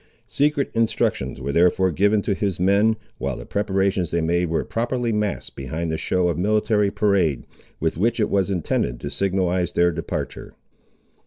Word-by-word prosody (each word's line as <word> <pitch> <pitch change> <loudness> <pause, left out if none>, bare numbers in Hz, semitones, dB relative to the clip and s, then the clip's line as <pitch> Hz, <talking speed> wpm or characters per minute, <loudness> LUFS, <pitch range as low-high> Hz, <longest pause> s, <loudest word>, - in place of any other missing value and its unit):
Secret 145 0 +1
instructions 115 - 0
were 70 +2 -3
therefore 90 +3 +3
given 100 +4 +2
to 100 - 0
his 95 -2 -2
men, 100 +4 +3 0.2
while 65 -2 -2
the - - -8
preparations 95 -3 0
they 85 - 0
made 85 +2 +1
were 80 - -1
properly 120 +1 -1
masked 105 -1 -2
behind 80 +5 -4
the - - -1
show 90 -1 +1
of 85 -1 -1
military 105 +1 +2
parade, 90 - +1 0.3
with 80 0 -1
which 115 +4 +1
it 105 - +1
was 100 -1 +1
intended 80 -9 -1
to - - -5
signalise 90 -2 0
their 85 0 +3
departure. 85 0 -5
95 Hz, 165 wpm, -23 LUFS, 85-105 Hz, 0.3 s, therefore